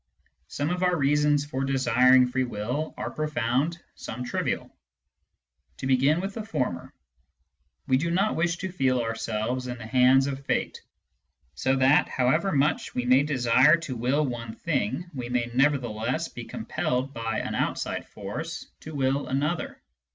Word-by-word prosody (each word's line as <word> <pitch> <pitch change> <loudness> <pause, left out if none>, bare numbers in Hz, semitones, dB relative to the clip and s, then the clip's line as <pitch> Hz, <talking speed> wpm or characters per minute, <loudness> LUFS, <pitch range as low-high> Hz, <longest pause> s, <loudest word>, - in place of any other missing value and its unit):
Some 145 - -2
of 180 0 -2
our 180 -1 +3
reasons 145 0 +2
for 135 -2 -3
desir 130 -1 +3
ing 130 -1 +6
free 130 +1 -1
will 125 +6 -3
are - - -4
profound, 150 +1 -1 0.2
some 125 +3 -7
trivial. 125 - -3 1.0
To - - -6
begin 135 +4 +3
with 195 +1 -4
the 225 - -4
former: 130 - -3 0.9
we 130 - +3
do 170 +5 -1
not 195 +5 +1
wish 170 +1 0
to 190 0 -4
feel 130 -7 +1
ourselves 115 +2 -2
in 125 0 -5
the 115 - -9
hands 130 +3 +4
of 140 0 -4
fate, - - -2 0.7
so 130 - +1
that, 135 +2 +4
however 155 +10 +1
much 145 0 0
we 125 - -1
may 130 +2 +5
desire 135 +1 +4
to 135 -6 -5
will 130 +6 +1
one 115 -3 -5
thing, 145 - -2
we 125 -3 -5
may 120 -1 -1
nevertheless 125 -4 0
be. - - -8
compelled 130 +2 -2
by 115 -1 -3
an - - -4
outside - - -2
force - - -6
to 155 -1 -9
will 135 0 0
another. 150 +5 -2
130 Hz, 160 wpm, -26 LUFS, 125-150 Hz, 1.0 s, ing